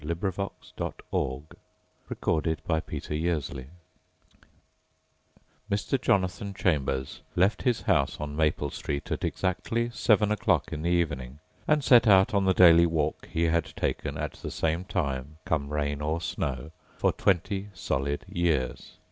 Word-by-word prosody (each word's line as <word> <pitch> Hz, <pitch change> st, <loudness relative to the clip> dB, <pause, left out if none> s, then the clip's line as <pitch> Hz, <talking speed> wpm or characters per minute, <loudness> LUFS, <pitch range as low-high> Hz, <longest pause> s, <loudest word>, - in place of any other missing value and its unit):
SIMAK 85 Hz, +5 st, -4 dB, 0.6 s
and -, -, -2 dB, 0.2 s
CARL 75 Hz, +3 st, -4 dB
JACOBI 80 Hz, -3 st, -2 dB, 2.0 s
Mr. 105 Hz, +6 st, 0 dB
Jonathon 100 Hz, 0 st, 0 dB
Chambers 70 Hz, -6 st, -1 dB
left 95 Hz, +4 st, +2 dB
his 125 Hz, -3 st, +1 dB
house 85 Hz, -, +1 dB
on 75 Hz, -1 st, -5 dB
Maple 75 Hz, -2 st, +1 dB
Street 70 Hz, 0 st, -4 dB
at -, -, -2 dB
exactly 115 Hz, +6 st, -1 dB
seven 105 Hz, -3 st, +3 dB
o'clock 105 Hz, -, +1 dB
in 75 Hz, -, -4 dB
the 85 Hz, -, 0 dB
evening 75 Hz, -7 st, -1 dB, 0.3 s
and 150 Hz, -1 st, +3 dB
set 120 Hz, -4 st, +6 dB
out 95 Hz, +2 st, +6 dB
on 100 Hz, -1 st, +2 dB
the 95 Hz, -, +4 dB
daily 85 Hz, -1 st, +7 dB
walk 80 Hz, -3 st, -1 dB
he 85 Hz, -, 0 dB
had 85 Hz, 0 st, +2 dB
taken, -, -, -2 dB
at -, -, -3 dB
the -, -, -7 dB
same 80 Hz, +3 st, -1 dB
time, 70 Hz, -5 st, -3 dB
come 70 Hz, -3 st, -1 dB
rain 75 Hz, -1 st, -1 dB
or 75 Hz, +2 st, -1 dB
snow, 70 Hz, -3 st, -3 dB, 0.3 s
for -, -, +2 dB
twenty 95 Hz, +1 st, 0 dB
solid 70 Hz, -4 st, -2 dB
years. 80 Hz, -7 st, -1 dB
80 Hz, 130 wpm, -28 LUFS, 75-95 Hz, 2.0 s, daily